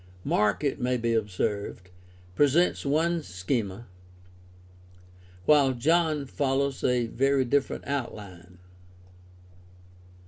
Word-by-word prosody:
Mark, 105 +6 +1
it 140 -1 -1
may 125 0 +1
be 115 0 0
observed, 100 -3 -2 0.4
presents 145 - +2
one 165 +4 +1
schema, 95 +2 -3 1.6
while 140 -3 +5
John 155 +3 +1
follows 135 0 -1
a 125 -1 +2
very 135 +3 +1
different 140 +2 0
outline. 100 -10 -6
130 Hz, 90 wpm, -27 LUFS, 105-140 Hz, 1.6 s, while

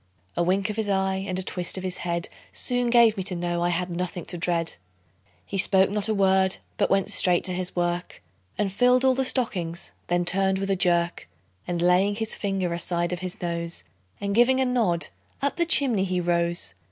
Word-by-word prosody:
A - - 0
wink 190 +4 +1
of 210 - -8
his 220 -2 -2
eye, 190 -1 0
and 185 -2 -2
a 190 - -2
twist 180 0 -1
of 185 - -5
his 185 -1 -3
head, 170 -1 -2 0.2
Soon 245 -1 +4
gave 235 -2 +5
me - - -1
to 185 0 -2
know 175 0 -2
I 175 - +1
had 175 +1 -2
nothing 175 -1 -4
to - - -2
dread. 170 - -1 0.7
He 195 - -2
spoke 190 0 +3
not 210 +1 0
a - - +2
word, 190 -1 +2 0.2
but - - +1
went 195 +1 +1
straight 180 -3 +4
to 185 - -3
his 180 0 -4
work, 175 0 -2 0.4
And 200 -2 -1
filled 250 +4 +3
all 260 - +5
the 265 +1 0
stockings; 190 -10 -1 0.2
then 175 0 0
turned 190 +1 +2
with 195 +1 -2
a - - +2
jerk, 175 - +1 0.4
And 175 -1 -2
laying 185 +3 +3
his 220 +1 -1
finger 195 -4 -1
aside 175 0 -1
of 180 - -4
his 180 0 -6
nose, 170 - -3 0.4
And 200 0 -2
giving 240 +4 +4
a 265 - +2
nod, 205 -11 0 0.3
up 280 +3 -2
the 340 -1 +1
chimney 250 - +3
he 185 -1 -1
rose. 170 - -1
185 Hz, 210 wpm, -25 LUFS, 175-205 Hz, 0.7 s, gave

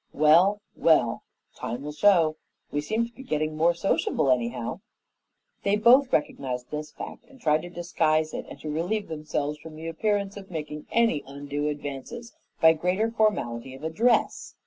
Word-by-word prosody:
Well, 170 +8 +5
well, 135 -8 +3 0.3
time 125 +3 -5
will 150 - -5
show. 165 -2 +4 0.4
We 145 - -1
seem 220 +9 0
to 235 - -13
be 265 - -12
getting 155 - -2
more 170 +2 +3
sociable, 170 -6 +1
anyhow." 120 -1 -1 0.8
They 200 +1 +2
both 250 +5 +5
recognized 125 -4 -1
this 150 0 -5
fact - - -8
and 275 -1 -18
tried 155 -5 +2
to 175 - -8
disguise 160 -3 0
it - - -5
and - - -10
to 155 - -4
relieve 180 +7 -2
themselves 150 -1 -3
from 160 -1 -11
the 160 +1 -9
appearance 200 +3 -1
of 195 -1 -10
making 150 -3 -6
any 230 -10 +2
undue 145 +1 -4
advances 145 - -6 0.3
by 160 -1 +7
greater 180 +7 0
formality 135 - 0
of 135 - -13
address. 220 +10 +1
160 Hz, 165 wpm, -26 LUFS, 150-200 Hz, 0.8 s, by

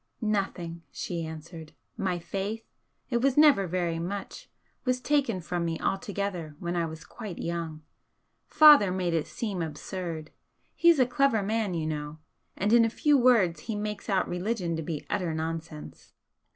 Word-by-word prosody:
"Nothing," 175 -4 -3
she 170 -2 -4
answered 160 0 -9 0.2
"My 190 -5 -1
faith 200 +5 -4 0.5
it 240 - +2
was 270 +1 +2
never 285 -11 +6
very 170 -1 -1
much, 195 +4 -6 0.3
was 255 0 +1
taken 265 -7 +1
from 175 +1 -2
me 165 -1 -2
altogether 195 -6 -3
when 175 +1 -3
I 170 -1 0
was 160 0 -9
quite 215 -6 -8
young. 165 -2 -4 0.6
Father 295 -11 +8
made 180 -2 -1
it 160 -2 0
seem 200 -6 -4
absurd. 160 0 -5 0.4
He's 340 -2 +5
a 255 - +5
clever 265 -4 +2
man, 215 -2 -1
you 160 -2 -2
know 150 -1 -4 0.4
and 205 +4 +1
in 235 -1 +7
a 230 - +2
few 295 +6 +2
words 235 -10 +4
he 220 - -1
makes 210 0 -4
out 195 - +2
religion 180 -1 -2
to 160 - -3
be 155 -1 -5
utter 175 -5 -1
nonsense." 160 -1 -6
185 Hz, 160 wpm, -28 LUFS, 165-220 Hz, 0.6 s, Father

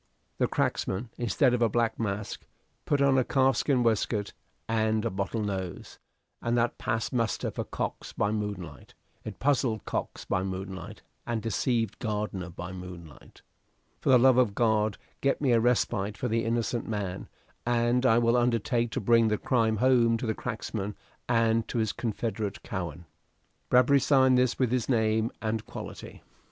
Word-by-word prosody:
The - - +3
cracksman, 105 +5 -1
instead 125 +2 +2
of 125 - 0
a 115 - +4
black 115 +1 0
mask, 105 -2 -3 0.4
put 140 -1 +2
on 135 -1 +4
a - - +3
calf 135 -1 +2
skin 130 -4 +2
waistcoat 110 -2 0 0.3
and 110 0 +1
a 115 - 0
bottle 100 +3 -2
nose, 95 -4 -5 0.4
and 120 0 0
that 120 0 0
passed 110 0 -2
muster 115 -2 0
for - - -3
Cox - - -4
by 105 - 0
moonlight; 100 -9 -5 0.3
it - - -7
puzzled 130 -5 +1
Cox - - -4
by 95 - 0
moonlight, 95 -1 -6 0.2
and 120 -1 -1
deceived 115 0 -1
Gardiner 105 -5 -3
by 90 +2 -7
moonlight. 90 -4 -11 0.6
"For - - -1
the 130 - +8
love 130 +1 +5
of 110 -6 +2
God 110 -3 +2 0.2
get 140 - +1
me 140 -3 +2
a 115 - +5
respite 110 -4 +1
for 125 - -2
the 115 0 0
innocent 115 +1 -1
man, 100 -4 -4 0.3
and 120 +1 +2
I 115 -3 +5
will 120 0 +3
undertake 120 0 +1
to - - -1
bring 115 +2 +4
the 105 -1 +1
crime 110 -3 +1
home 120 -1 +4
to 120 - -4
the 110 - 0
cracksman 110 -4 -4 0.3
and 115 -1 +2
to - - -4
his 110 -3 0
confederate 110 -2 -3
Cowen." 85 -3 -5 0.6
Bradbury 130 +3 +5
signed 130 -1 +4
this 125 -1 +2
with 125 -3 +1
His 125 -1 0
name 110 -1 +2
and 110 0 -1
quality. - - -9
115 Hz, 165 wpm, -28 LUFS, 105-120 Hz, 0.6 s, the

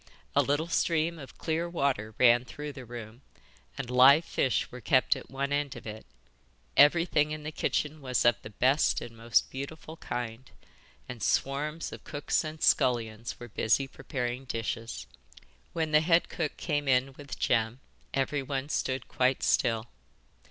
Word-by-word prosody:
A - - +6
little 145 +4 0
stream 165 0 +1
of 135 - -11
clear 165 +1 -1
water 130 -10 -1
ran 120 -1 +6
through 145 +3 -7
the 130 -3 -9
room, 115 0 -9 0.6
and 135 - -4
live 130 +6 +6
fish 130 - 0
were 125 - -9
kept 130 +1 +3
at - - -10
one 140 +1 -2
end 145 -2 -1
of - - -10
it. 110 0 -8 0.7
Everything 150 0 +5
in 155 0 -5
the 155 - -4
kitchen 150 0 -1
was 125 -3 0
of 120 -1 +6
the - - -9
best 130 +7 +2
and 115 - -9
most 115 0 +1
beautiful 155 +4 -7
kind, 120 -2 -5 0.6
and 125 -2 -8
swarms 150 +8 -1
of - - -9
cooks 145 +2 -1
and 155 0 -6
scullions 115 -2 +1
were 120 - -8
busy 115 +4 +1
preparing 130 -1 -4
dishes. 115 - -4 0.7
When 160 -2 -2
the 150 0 +6
head 165 +1 +3
cook 155 -4 -3
came 145 -3 -1
in 130 +1 +2
with 140 -3 -8
Jem 115 +1 +1 0.3
everyone 135 0 -1
stood 130 -3 -2
quite 130 +1 +1
still. 115 -3 +2
135 Hz, 160 wpm, -29 LUFS, 120-150 Hz, 0.7 s, A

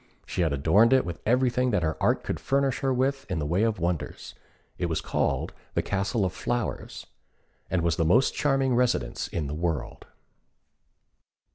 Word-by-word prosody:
She - - -2
had 80 -3 +2
adorned 80 - +4
it 130 - +4
with 85 -1 -6
everything 125 +1 +2
that 105 -7 +1
her 80 0 0
art - - +2
could - - -3
furnish 135 -1 0
her 135 -1 0
with 135 +2 0
in 90 - -1
the 75 - -2
way 85 +6 +1
of 110 -1 +1
wonders. 85 -1 -3 0.5
It 90 - 0
was 80 -2 -1
called - - -1 0.2
the - - +1
Castle 100 +2 0
of 90 - -2
Flowers, 115 +6 -3 0.6
and 90 -2 0
was 85 -1 +1
the - - +2
most 115 +12 +3
charming 135 -3 +1
residence 125 0 0
in 80 - -3
the 70 - -4
world. 80 -1 -3
100 Hz, 175 wpm, -27 LUFS, 85-125 Hz, 0.6 s, adorned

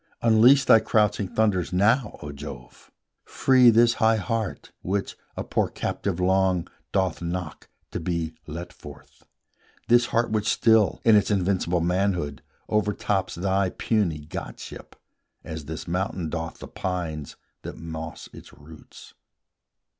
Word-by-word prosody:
Unleash 120 +5 +6
thy 115 - +7
crouching 105 -2 +1
thunders 100 -4 0
now, 105 +8 +2
O 75 - -6
Jove! 70 -4 -10 0.3
Free 130 -2 +4
this 115 +1 +5
high 110 0 +5
heart, 110 0 -3
which, 100 +2 -2 0.2
a - - -2
poor - - 0
captive 95 -3 -3
long, 95 -1 +2 0.2
Doth 95 -4 0
knock 85 -2 -5 0.2
to - - -3
be 80 -1 -2
let 85 +3 -7
forth, 75 -1 -14 0.7
this 120 +1 +5
heart 115 -1 0
which 110 -1 0
still, 110 -3 +3
In 115 -2 +7
its 105 - +3
invincible 90 -3 +1
manhood, 90 -5 0 0.3
overtops 105 -2 0
Thy 95 +1 +1
puny 90 -9 -1
godship, - - -8 0.5
as 80 -2 -7
this 80 +1 -7
mountain 90 -1 -2
doth 80 0 -5
The - - -9
pines 85 -6 -4 0.3
that - - -8
moss 80 -1 -7
its - - -13
roots. 75 +2 -15
95 Hz, 130 wpm, -25 LUFS, 80-110 Hz, 0.7 s, thy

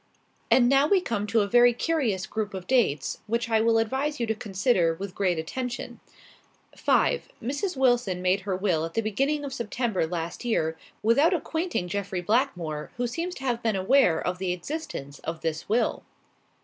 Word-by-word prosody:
"And 245 -2 +5
now 275 +3 +4
we 390 +3 +4
come 210 - -2
to 225 +1 +3
a 200 - 0
very 240 +3 +6
curious 240 - 0
group 215 -2 -4
of 185 -1 -6
dates, 210 - +1
which 230 +1 -1
I 220 -1 +4
will 225 0 +3
advise 265 +7 -1
you 235 - +1
to 220 - 0
consider 195 -4 +1
with 195 +2 -6
great 185 -4 0
attention. 245 +10 -4 0.8
"5. - - +1
Mrs. 285 - -3
Wilson 245 -8 +2
made 185 +2 +2
her 195 -1 -2
will 185 -5 +1
at 165 0 -5
the 225 - +1
beginning 275 +8 0
of 270 - -5
September 235 -6 -1
last 170 +3 -4
year, 160 -9 0 0.3
without 280 - +4
acquainting 330 - -2
Jeffrey 190 0 -3
Blackmore, 180 - -1
who 245 - 0
seems 335 +9 -3
to 270 - -9
have 240 -3 -1
been 225 -3 0
unaware 190 -4 +4
of 180 0 -3
the 185 -2 0
existence 180 - -6
of 165 0 -5
this 160 +1 -3
will. 230 +3 +1
220 Hz, 180 wpm, -26 LUFS, 180-260 Hz, 0.8 s, very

